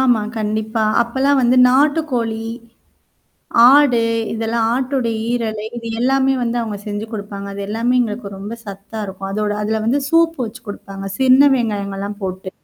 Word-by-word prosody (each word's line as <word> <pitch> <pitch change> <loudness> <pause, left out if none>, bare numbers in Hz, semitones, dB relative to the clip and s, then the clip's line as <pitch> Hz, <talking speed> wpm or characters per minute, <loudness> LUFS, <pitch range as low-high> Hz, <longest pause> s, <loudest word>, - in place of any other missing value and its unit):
ஆமா. 245 -4 +3 0.2
கண்டிப்பா. 220 +1 -1 0.2
அப்பலாம் 265 +4 +1
வந்து 245 +1 +3
நாட்டுக்கோழி. 260 -5 +1 1.3
ஆடு 275 -4 +5 0.3
இதெல்லாம் 225 0 -1
ஆட்டுடைய 255 -2 -1 0.2
ஈரலை 220 -3 -2
இது 230 -1 -7
எல்லாமே 270 +1 +2
வந்து 235 0 -1
அவங்க 220 -3 -4
செஞ்சு 205 +1 -4
குடுப்பாங்க. 200 -2 -6
அது 200 - -6
எல்லாமே 230 +4 0
எங்களுக்கு 220 -2 -3
ரொம்ப 205 +4 -6
சத்தா 200 +2 -8
இருக்கும். 195 0 -7
அதோட 210 0 -1
அதுல 220 +1 -1
வந்து 245 +6 +2
சூப்பு 330 -1 +3
வச்சு 235 +3 -10
குடுப்பாங்க. 195 -1 -7
சின்ன 265 +2 +6
வெங்காயங்கள்லாம் 200 -3 -3
போட்டு. 185 0 -5
225 Hz, 140 wpm, -18 LUFS, 210-255 Hz, 1.3 s, சின்ன